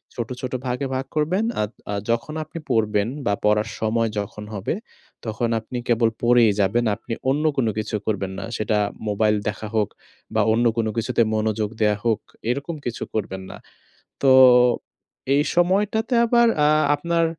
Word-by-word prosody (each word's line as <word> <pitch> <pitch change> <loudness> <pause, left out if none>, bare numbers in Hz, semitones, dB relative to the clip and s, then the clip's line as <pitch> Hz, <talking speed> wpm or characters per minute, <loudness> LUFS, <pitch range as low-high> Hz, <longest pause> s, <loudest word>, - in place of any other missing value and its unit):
ছোট, 120 -1 -4
ছোট 130 - -4
ভাগে 125 +3 -2
ভাগ 130 +1 -2
করবেন। 165 +8 +1 0.2
আদ 105 - -2 0.2
আ - - -1 0.2
যখন 115 +6 -1
আপনি 160 +2 -8
পড়বেন 105 -2 +1 0.2
বা 100 - +2
পড়ার 105 0 +2
সময় 115 +1 +1
যখন 105 +1 -6
হবে 100 +5 -2 0.5
তখন 115 +1 -1
আপনি 110 +3 -7
কেবল 115 -1 +3
পড়েই 120 -2 +5
যাবেন, 110 +5 +2
আপনি 115 - -7 0.2
অন্য 145 +3 +1
কোনো 115 -4 +2
কিছু 110 0 -2
করবেন 100 -3 -2
না। - - -5
সেটা 110 0 0 0.3
মোবাইল 105 +1 +2
দেখা 105 +1 -3
হোক 105 -2 +2 0.5
বা 110 - +4
অন্য 120 +2 +2
কোন 115 -1 +1
কিছুতে 120 +1 +1
মনোযোগ 110 -1 0
দেয়া 105 -1 +3
হোক 110 -3 +2 0.3
এরকম 140 +6 -2
কিছু 120 -1 -3
করবেন 95 -3 -3
না। - - -9 0.6
তো 135 -1 +5 1.0
এই 145 - +4
সময়টাতে 205 +7 +2
আবার 235 0 +4
অ্যা 150 0 +4 0.3
আপনার 170 +2 0
115 Hz, 160 wpm, -23 LUFS, 105-140 Hz, 1.0 s, পড়েই